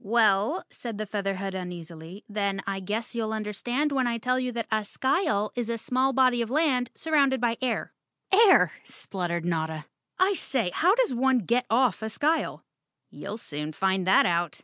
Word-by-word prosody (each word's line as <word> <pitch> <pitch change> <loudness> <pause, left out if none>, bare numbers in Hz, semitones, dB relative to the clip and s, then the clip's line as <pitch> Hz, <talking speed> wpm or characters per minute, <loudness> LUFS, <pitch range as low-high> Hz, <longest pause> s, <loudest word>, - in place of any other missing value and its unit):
"Well," 215 - +2
said 230 -4 -7
the 215 - -3
Featherhead 195 -2 -3
uneasily, 175 0 -8
"then 200 -2 -2
I 195 -1 -2
guess 210 +4 -4
you'll 225 -2 -2
understand 240 +7 -2
when 260 -3 +1
I 235 -1 -1
tell 250 +2 0
you 255 -1 -2
that 230 -1 -3
a 215 0 +1
skyle 215 - 0
is 240 -2 -3
a 230 - -1
small 255 +4 +1
body 255 -2 +3
of 230 - -2
land 265 -3 +2
entirely - - -29
surrounded 280 -4 +2
by 235 -1 +1
air." 250 -3 -2 0.4
"Air!" 400 0 +6
spluttered 170 -3 -4
Notta. 160 -2 -2 0.3
"I 380 +2 +3
say, 250 - -1
how 365 +5 +3
does - - +2
one 260 +1 +3
get 240 +3 0
off 235 -4 +2
a 220 - -3
skyle?" 305 +8 -1 0.5
"You'll 215 - -6
soon 150 -6 -6
find 190 +1 0
that 190 - +6
out!" 170 -2 0
225 Hz, 180 wpm, -26 LUFS, 195-255 Hz, 0.5 s, Air